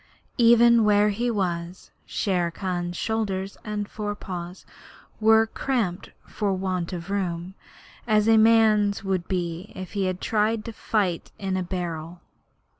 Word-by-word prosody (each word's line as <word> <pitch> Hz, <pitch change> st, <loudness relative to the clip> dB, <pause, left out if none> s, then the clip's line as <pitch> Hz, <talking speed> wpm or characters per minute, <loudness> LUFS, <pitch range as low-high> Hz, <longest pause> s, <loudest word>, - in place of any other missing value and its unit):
Even 235 Hz, 0 st, +6 dB
where 210 Hz, 0 st, +4 dB
he 235 Hz, +4 st, -1 dB
was, 180 Hz, -4 st, -3 dB, 0.2 s
Shere 180 Hz, -4 st, 0 dB
Khan's 175 Hz, 0 st, -3 dB
shoulders 200 Hz, -3 st, -2 dB
and 210 Hz, -1 st, -3 dB
fore 205 Hz, -1 st, -4 dB
paws 180 Hz, -2 st, -7 dB, 0.5 s
were 220 Hz, 0 st, +5 dB
cramped 220 Hz, -6 st, -2 dB, 0.2 s
for 205 Hz, -2 st, -2 dB
want 185 Hz, -2 st, -2 dB
of 180 Hz, +1 st, -6 dB
room, 180 Hz, -2 st, -2 dB, 0.5 s
as 215 Hz, -1 st, +3 dB
a 225 Hz, 0 st, +6 dB
man's 215 Hz, -2 st, +4 dB
would 190 Hz, -3 st, -1 dB
be 175 Hz, 0 st, -3 dB
if 185 Hz, 0 st, -7 dB
he 195 Hz, -3 st, 0 dB
tried 215 Hz, +3 st, 0 dB
to 230 Hz, -, -6 dB
fight 200 Hz, -6 st, -1 dB
in 190 Hz, -1 st, -2 dB
a 185 Hz, -, 0 dB
barrel. 175 Hz, -2 st, -5 dB
195 Hz, 135 wpm, -25 LUFS, 180-215 Hz, 0.5 s, Even